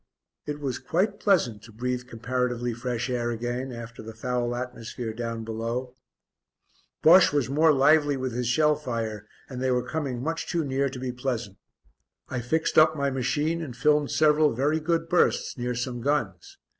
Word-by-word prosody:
It 150 0 -3
was 135 -4 -3
quite 195 +9 0
pleasant 140 - +2
to 115 +2 -14
breathe 125 +2 -3
comparatively 125 0 -2
fresh 120 +1 -3
air 120 -2 -1
again 120 +3 -3
after 115 -1 -8
the 110 0 -9
foul 120 +1 -1
atmosphere 120 -2 -5
down 115 0 -4
below. 115 +3 -4 1.1
Bosche 175 +3 +7
was 145 -3 0
more 155 +3 +5
lively 145 0 +4
with 130 -2 -3
his 125 0 -2
shell 150 +5 +3
fire 115 -7 -4 0.2
and 125 -1 -6
they 130 - +1
were 125 -1 0
coming 135 -3 -3
much 165 +2 -2
too 170 -2 0
near 135 0 0
to 130 - -8
be 125 0 -3
pleasant. 120 -5 -4 0.7
I 125 - -2
fixed 160 +8 +2
up 155 0 +5
my 140 -1 0
machine 145 +6 0
and 130 -7 -7
filmed 150 +1 +3
several 150 -3 +3
very 145 +5 +1
good 165 +1 0
bursts 175 +1 +2
near 125 -1 -3
some 120 0 -3
guns. 150 - -2
125 Hz, 170 wpm, -26 LUFS, 120-150 Hz, 1.1 s, Bosche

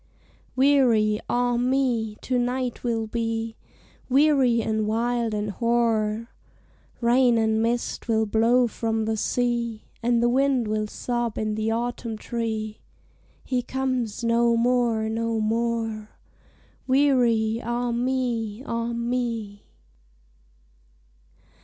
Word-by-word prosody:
Weary, 250 -6 +3
ah 245 0 +1
me! 245 -4 0
to 255 -1 0
night 250 0 -2
will 230 -2 -1
be, 225 0 -3 0.5
Weary 270 -3 +4
and 220 -1 -1
wild 230 0 0
and 210 0 -2
hoar; 230 0 0 0.7
Rain 240 0 +4
and 220 0 +2
mist 235 +1 -2
will 220 -1 +2
blow 230 +4 +3
from 225 0 -2
the 220 0 0
sea, 235 -1 -1 0.2
And 235 0 +2
the - - +4
wind 260 -1 +2
will 215 0 -1
sob 240 0 -3
in 215 -1 -1
the 220 +1 -1
autumn 230 0 -3
tree, 220 -2 -4 0.7
"_He 250 -2 -1
comes 255 -4 -2
no 235 0 +3
more, 235 -2 +1
no 225 0 -1
more. 225 -1 -1 0.8
Weary, 240 -5 +3
ah 240 +1 -1
me! 240 -2 -1
ah 230 -1 -2
me! 235 -3 -3
235 Hz, 110 wpm, -25 LUFS, 220-245 Hz, 0.8 s, Weary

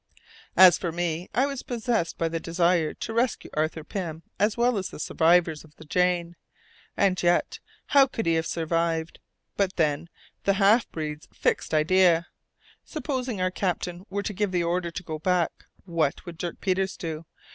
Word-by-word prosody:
As 185 -2 +8
for 175 - -2
me, 170 0 -2
I 260 - +2
was 275 -2 -4
possessed 230 -7 -1
by 165 - 0
the 165 0 -2
desire 170 -1 +1
to 225 - -5
rescue 235 +1 0
Arthur 155 +1 -1
Pym 165 -2 -5 0.2
as 210 +2 +2
well 240 -2 +2
as 190 - -4
the - - -10
survivors 165 0 +2
of 155 -1 -19
the - - -14
Jane. 175 +1 +1 0.6
And 190 -2 +2
yet, 175 0 +1 0.3
how 275 -2 +5
could 225 - -4
he 165 - +3
have 160 0 0
survived! 165 0 -1 0.4
But 195 -1 +1
then, 155 0 0 0.3
the 200 - +3
half 205 +4 +4
breed's 150 -1 -5
fixed - - -1
idea! 170 +2 +4 0.6
Supposing 255 - -3
our 185 0 +1
captain 180 0 -3
were 200 +1 -2
to 210 - -3
give 205 0 -1
the 175 -2 +1
order 175 +1 0
to 170 - -6
go 155 -2 -5
back, 180 0 0 0.2
what 165 -5 -1
would 170 -2 -9
Dirk 175 -1 -5
Peters 190 0 0
do? 160 -1 -5
175 Hz, 175 wpm, -26 LUFS, 165-195 Hz, 0.6 s, As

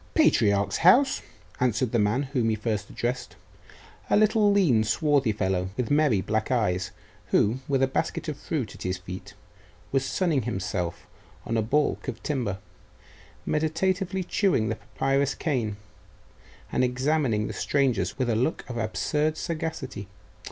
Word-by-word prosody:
'Patriarch's 100 - +3
house?' 260 - +5 0.4
answered 125 -1 +1
the 120 - +2
man 105 +7 +2
whom 120 -5 +2
he 110 - +1
first 105 -2 -3
addressed, 125 +2 -3 0.7
a - - +4
little 215 0 +4
lean, 160 - +4
swarthy 135 +2 +2
fellow, 95 -3 -1
with 125 -1 -1
merry 145 -9 +3
black 110 +4 -1
eyes, 95 -7 +1 0.4
who, 115 +5 +2
with 135 -2 +2
a - - +4
basket 160 +4 -2
of 155 - -2
fruit 140 -4 -3
at - - -14
his 90 0 -2
feet, 90 0 -9 0.6
was 135 -1 +2
sunning 155 0 +1
himself 95 -6 -3 0.4
on 115 - -2
a 110 - +2
baulk 145 +7 0
of - - -5
timber, 120 -10 -1 0.9
meditatively 185 +5 0
chewing 180 - +1
the 110 - -1
papyrus 135 +3 0
cane, 120 -9 -1 0.9
and - - +1
examining 130 -3 +1
the - - -4
strangers 125 - 0
with 130 -2 0
a 115 - +1
look 125 +8 -1
of 125 - -5
absurd 150 +7 0
sagacity. 155 - -4
125 Hz, 145 wpm, -26 LUFS, 110-155 Hz, 0.9 s, house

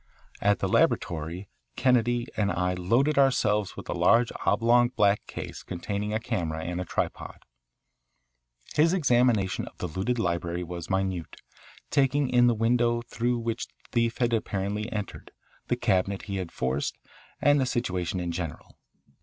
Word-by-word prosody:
At 105 0 +3
the - - -1
laboratory 85 +4 0 0.3
Kennedy 120 -2 +2
and 100 -1 +1
I 90 +1 0
loaded 120 +12 +2
ourselves 105 -7 +2
with - - -8
a - - -2
large 115 0 +4 0.2
oblong 120 +3 +4
black 105 -4 +2
case - - -7
containing 100 +4 -4
a 110 - 0
camera 85 -9 -3
and 90 +2 -3
a - - -4
tripod. - - -4 1.3
His 165 +3 +4
examination 120 - +2
of - - -12
the - - -4
looted 95 +9 -2
library 85 -3 -1
was 85 -1 -7
minute, 95 -4 -1 0.6
taking 140 0 +2
in 120 -1 +5
the 120 - +3
window 120 +1 +2
through 120 +1 -1
which 115 0 -3
the - - -35 0.2
thief 115 -1 +1
had 120 -1 +1
apparently 105 0 -2
entered, 105 -4 -5 0.4
the - - +1
cabinet 95 +1 0
he 100 -2 -4
had 90 -3 -4
forced, 65 +2 -2 0.4
and 145 -1 +4
the 130 - +1
situation 95 -8 -1
in 85 -1 -2
general. 85 -2 -6
105 Hz, 155 wpm, -27 LUFS, 90-120 Hz, 1.3 s, in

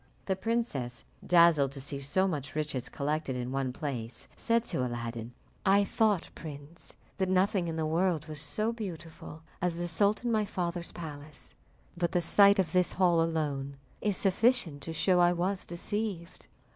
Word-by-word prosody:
The 190 - +1
princess, 190 - -2 0.2
dazzled 170 -6 +5
to 140 - -6
see 140 +1 -3
so 150 +8 +1
much 140 -6 -3
riches 140 -5 -2
collected 145 -1 -2
in 125 0 -3
one 135 -1 -1
place, 125 -5 -5
said 230 0 +1
to 130 - -1
Aladdin, 115 -1 -4 0.3
"I 200 0 +5
thought, 205 -2 +1
prince, 150 +1 -8 0.2
that 190 -1 0
nothing 185 0 +2
in 165 - -3
the 160 -1 -1
world 165 -1 +1
was 155 -2 -7
so 215 +10 -1
beautiful 165 -7 -8 0.2
as 175 -1 +1
the 175 +1 -2
sultan 205 +7 +1
my 215 -2 +3
father's 175 -3 -3
palace, 150 -2 -7 0.4
but 170 -1 -1
the 180 - +3
sight 200 +4 +6
of 185 -5 +1
this 180 0 +2
hall 175 -3 +4
alone 145 -4 -1 0.2
is 205 -3 +1
sufficient 195 - +2
to 165 - -5
show 180 +3 +3
I 175 0 +5
was 185 +2 -1
deceived." 185 0 -3
170 Hz, 165 wpm, -30 LUFS, 145-190 Hz, 0.4 s, sight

